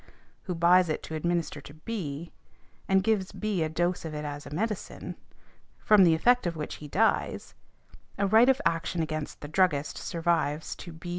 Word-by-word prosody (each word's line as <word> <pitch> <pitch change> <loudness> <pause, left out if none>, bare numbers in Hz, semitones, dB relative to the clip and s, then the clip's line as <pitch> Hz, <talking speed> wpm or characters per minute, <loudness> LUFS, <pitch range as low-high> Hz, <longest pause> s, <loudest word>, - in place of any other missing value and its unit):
who 180 - -3
buys 175 +1 +5
it 155 - -2
to - - -7
administer 165 -2 -1
to 145 - -13
B., 160 -4 -5 0.5
and 190 0 +3
gives 205 -3 +1
B. 210 -5 -2
a 160 - 0
dose 175 +3 -1
of 160 -2 -5
it 150 0 -4
as 145 0 -6
a - - -7
medicine, 210 +7 -4 0.6
from 210 -2 +5
the 165 -3 +5
effect 245 +5 +3
of 170 - -2
which 150 -2 -5
he 150 - -7
dies, 215 +10 0 0.6
a 200 - +1
right 220 +5 +6
of 265 0 +4
action 165 0 0
against 155 -1 -5
the 145 - -6
druggist 150 -2 +1
survives 165 -3 -1
to 175 - -9
B. 165 +2 -9
170 Hz, 180 wpm, -28 LUFS, 155-190 Hz, 0.6 s, right